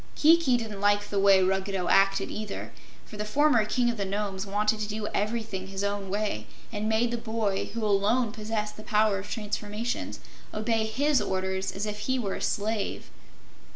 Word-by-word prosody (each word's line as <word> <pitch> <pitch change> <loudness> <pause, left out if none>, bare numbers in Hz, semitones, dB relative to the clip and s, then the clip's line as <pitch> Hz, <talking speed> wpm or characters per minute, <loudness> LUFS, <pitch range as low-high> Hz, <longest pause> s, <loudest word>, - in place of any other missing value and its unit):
Kiki 315 -5 +5
didn't 215 -4 -5
like 205 0 +3
the 200 - +1
way 195 -1 +6
Ruggedo 190 0 0
acted 195 0 +3
either, 215 -1 -5 0.3
for 210 - -10
the 210 - -2
former 240 0 +3
King 245 +3 +1
of 230 - -7
the 200 - -1
Nomes 195 0 -3
wanted 210 +2 +1
to 210 - -2
do 215 0 -3
everything 210 -3 -2
his 195 +1 -4
own 200 -1 -2
way, 200 - -2 0.2
and 215 0 -2
made 230 +2 +2
the 240 - -2
boy, 220 -4 -1
who 230 -2 -1
alone 210 +3 +2
possessed 215 -1 -3
the 215 - -9
power 210 -2 +2
of 195 - -8
transformations, 210 +2 -3 0.4
obey 220 0 +1
his 280 +5 +2
orders 190 0 -1
as 200 +2 -3
if 210 0 -4
he 260 +5 0
were 205 -6 -2
a - - -5
slave. 210 0 -2
210 Hz, 185 wpm, -28 LUFS, 200-225 Hz, 0.4 s, way